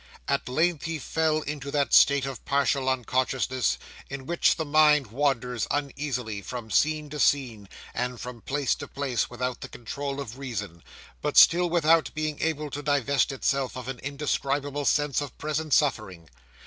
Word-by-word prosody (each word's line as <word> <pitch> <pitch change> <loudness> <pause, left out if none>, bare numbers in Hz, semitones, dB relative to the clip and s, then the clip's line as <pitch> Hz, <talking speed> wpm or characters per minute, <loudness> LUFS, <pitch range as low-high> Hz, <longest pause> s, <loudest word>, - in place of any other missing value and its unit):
At - - -1
length 160 +4 +1
he 165 -1 -2
fell 155 +2 0
into 145 -2 -5
that 140 -1 0
state 140 -2 +6
of 135 -2 -6
partial 140 -1 +1
unconsciousness, 130 - 0 0.3
in 140 -1 -6
which 170 +4 +2
the 160 - -3
mind 150 -5 +4
wanders 125 -3 0
uneasily 135 -7 -3
from 115 0 -7
scene 155 +5 +2
to 150 - -5
scene, 120 -10 +1 0.2
and 125 0 -3
from 125 -2 -8
place 140 0 0
to - - -7
place, 135 -4 -2
without 125 0 -4
the - - -7
control 140 +4 -5
of 130 -2 -7
reason, 105 -11 -5 0.4
but 150 0 -2
still 175 +1 +7
without 165 -1 +3
being 155 -1 -3
able 155 -2 -1
to 145 - -4
divest 140 -1 +1
itself 135 -1 -1
of 125 -1 -7
an 135 -2 -5
indescribable 140 0 -2
sense 145 -1 +2
of 145 -4 -7
present 155 0 -3
suffering. 105 - +1
140 Hz, 160 wpm, -26 LUFS, 125-150 Hz, 0.4 s, still